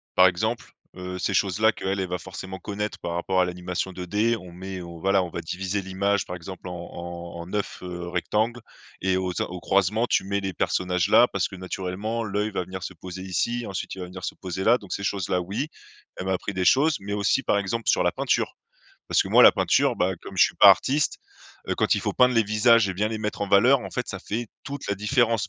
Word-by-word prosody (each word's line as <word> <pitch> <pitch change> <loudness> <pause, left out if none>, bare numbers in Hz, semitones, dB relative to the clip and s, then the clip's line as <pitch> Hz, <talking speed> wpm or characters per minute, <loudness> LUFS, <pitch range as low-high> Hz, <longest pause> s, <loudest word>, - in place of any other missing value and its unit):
Par 95 0 +8
exemple, 110 +6 -2 0.2
heu, 90 0 -6
ces 90 +2 -1
choses 95 0 +1
là 110 0 +5
qu'elle 95 -1 -2
va 90 - -2
forcément 95 +1 -8
connaître 105 +2 -4
par 85 0 -4
rapport 95 +2 +1
à - - +3
l'animation 90 +1 -3
2D. 105 +6 0
On 90 -1 -12
met, 95 +2 -7
heu, - - -7 0.2
voilà, 95 +2 +2
on 90 - -5
va 85 - -4
diviser 95 +4 -3
l'image, 95 +1 0
par 90 - -6
exemple, 90 +1 -9
en 90 - -6 0.2
en 85 0 -7
en 85 - -7
9, 105 +1 -3
heu, 90 -1 -6
rectangles 110 +7 -1 0.4
et 95 0 +2
au 95 -1 -2
cen - - -2
au 90 0 -6
croisement, 100 +6 +2
tu - - +1
mets 100 +1 -1
les 95 -1 -3
personnages 90 +1 0
là 120 - +7
parce 100 -3 -1
que 95 - -10
naturellement, 95 +5 -3
l'œil 105 0 -1
va 95 - -2
venir 95 0 -7
se 95 - -5
poser 90 +2 -8
ici, 120 +6 -1
ensuite 95 -2 -5
il - - -10
va 90 - -4
venir 90 0 -10
se - - -3
poser 95 0 -5
là. 120 +4 +5
Donc 100 -5 -8
ces 100 - -4
choses-là, 95 -2 0
oui, 100 - -3 0.5
elle 90 - -5
m'a 95 - +1
appris 95 +2 -3
des 95 -1 -1
choses. 150 - +4
Mais 100 +1 -5
aussi, 105 +5 +2
par 105 - +2
exemple, 100 +3 -2
sur - - +3
la - - +2
peinture. - - 0 0.6
Parce - - +4
que - - -5
moi, - - +6
la - - +10
peinture, - - +2
bah, 95 +1 +1
comme - - -9
je - - +7
suis - - -1
pas - - +8
artiste, 145 +3 +2 0.5
heu, - - +1
quand - - +2
il - - -1
faut - - -2
peindre 125 0 +4
les 115 - +4
visages 110 +1 +4
et 95 - -3
bien 105 +4 0
les 110 0 -4
mettre 105 -1 -4
en 100 - -1
valeur, 125 +8 +5
en - - -7
fait, 125 - -3
ça 95 -2 -5
fait 115 +3 -3 0.2
toute 140 0 -6
la 100 - +1
différence. 110 0 +1
95 Hz, 245 wpm, -25 LUFS, 90-105 Hz, 0.6 s, la